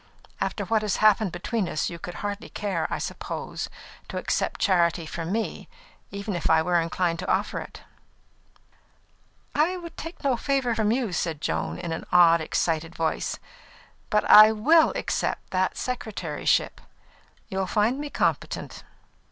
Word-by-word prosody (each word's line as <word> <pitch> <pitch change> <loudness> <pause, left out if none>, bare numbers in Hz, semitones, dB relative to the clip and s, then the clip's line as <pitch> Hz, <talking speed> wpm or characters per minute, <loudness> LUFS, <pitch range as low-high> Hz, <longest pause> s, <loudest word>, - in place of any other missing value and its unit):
After - - -2
what 220 -1 +1
has 210 -2 -1
passed 215 -2 +4
between 185 +2 -2
us, 155 - -1
you 170 - -7
would 175 - -6
hardly 205 +1 -5
care, 190 -6 -2
I - - -2
suppose, - - -5 0.4
to - - -5
accept - - -1
charity 170 -3 +2
from 165 +2 -5
me, 225 +2 -3 0.4
even 200 0 -4
if 175 - -1
I 160 0 +5
were 175 0 +2
inclined 165 0 -1
to - - -2
offer - - 0
it." - - -10 1.7
"I 330 +5 +2
would 335 -2 -9
take 330 +2 -8
no 265 -3 +2
favour 270 -2 0
from 220 -1 +1
you," 235 -5 0
said 165 -4 -2
Joan, 80 - -2
in 170 - -5
an 160 - -5
odd, 170 -2 +6
excited 165 +1 -1
voice. 160 -1 -1 0.7
"But 210 - +2
I 215 +1 +10
will 310 +10 +4
accept - - -2
that 185 0 0
secretaryship; 210 -11 -1 0.7
you'll 190 0 -2
find 220 +8 +1
me 295 0 -4
competent." - - -2
195 Hz, 150 wpm, -26 LUFS, 170-225 Hz, 1.7 s, I